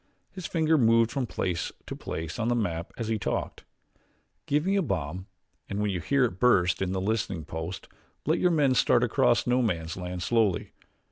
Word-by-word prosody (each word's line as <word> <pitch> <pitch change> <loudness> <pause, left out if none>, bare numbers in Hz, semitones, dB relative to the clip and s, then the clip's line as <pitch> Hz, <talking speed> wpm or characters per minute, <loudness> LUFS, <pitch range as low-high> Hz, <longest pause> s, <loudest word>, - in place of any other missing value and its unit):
His 185 -3 -6
finger 160 -2 +2
moved 115 -1 +4
from 135 -3 -2
place 90 -5 -2
to - - -6
place 80 +6 -5
on 115 - 0
the 120 - +2
map 85 -7 -2
as 115 - -3
he 110 -1 0
talked. 90 - -3 0.8
"Give 150 +3 +1
me 195 +1 +2
a 200 - +3
bomb 90 - -3 0.4
and 100 - -3
when 105 -1 0
you 90 - -2
hear 135 - +2
it 95 -6 -4
burst 90 -8 +3
in 95 -1 0
this 95 0 -2
listening 95 -6 -1
post 80 +3 -6 0.4
let - - +2
your 180 - +3
men 145 -6 +3
start 125 -1 +3
across 125 0 +3
No 125 +1 +2
Man's 80 -8 -1
Land 90 -1 -5
slowly. 105 -2 +1
110 Hz, 195 wpm, -27 LUFS, 90-125 Hz, 0.8 s, moved